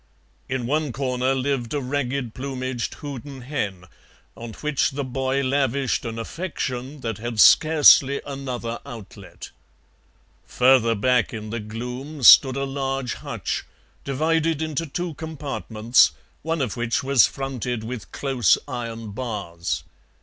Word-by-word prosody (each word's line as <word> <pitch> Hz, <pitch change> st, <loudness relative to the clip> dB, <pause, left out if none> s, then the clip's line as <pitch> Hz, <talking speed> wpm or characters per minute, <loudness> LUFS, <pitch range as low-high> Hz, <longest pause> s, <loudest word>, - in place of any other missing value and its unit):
In 130 Hz, -2 st, -2 dB
one 150 Hz, +2 st, 0 dB
corner 130 Hz, 0 st, 0 dB
lived 130 Hz, -2 st, -1 dB
a -, -, +1 dB
ragged 130 Hz, -2 st, -2 dB
plumaged 130 Hz, -2 st, -4 dB
Houdan 140 Hz, -2 st, -7 dB
hen, 100 Hz, -9 st, -4 dB, 0.5 s
on 115 Hz, -1 st, -8 dB
which 150 Hz, +1 st, 0 dB
the 140 Hz, +1 st, -4 dB
boy 130 Hz, +1 st, -1 dB
lavished 135 Hz, -1 st, 0 dB
an 115 Hz, -1 st, -4 dB
affection 130 Hz, -1 st, -4 dB
that 115 Hz, -4 st, -4 dB
had 120 Hz, -1 st, -4 dB
scarcely 145 Hz, -1 st, +7 dB
another 130 Hz, -4 st, -5 dB
outlet. 115 Hz, -5 st, -10 dB, 1.0 s
Further 125 Hz, -3 st, +4 dB
back 120 Hz, +2 st, +1 dB
in 110 Hz, -1 st, -6 dB
the 115 Hz, -, -3 dB
gloom 125 Hz, +7 st, -6 dB
stood 130 Hz, +2 st, +9 dB
a 135 Hz, -, -1 dB
large 135 Hz, -2 st, -2 dB
hutch, -, -, -4 dB, 0.4 s
divided 160 Hz, +3 st, 0 dB
into 160 Hz, 0 st, -2 dB
two 175 Hz, +3 st, -4 dB
compartments, 135 Hz, -7 st, +1 dB, 0.3 s
one 165 Hz, 0 st, -2 dB
of 120 Hz, -, -3 dB
which 120 Hz, 0 st, -1 dB
was 135 Hz, -3 st, +5 dB
fronted 125 Hz, -4 st, -4 dB
with 110 Hz, -6 st, -7 dB
close 125 Hz, -10 st, +2 dB
iron 115 Hz, -4 st, -5 dB
bars. 90 Hz, -, -4 dB
130 Hz, 130 wpm, -23 LUFS, 115-140 Hz, 1.0 s, stood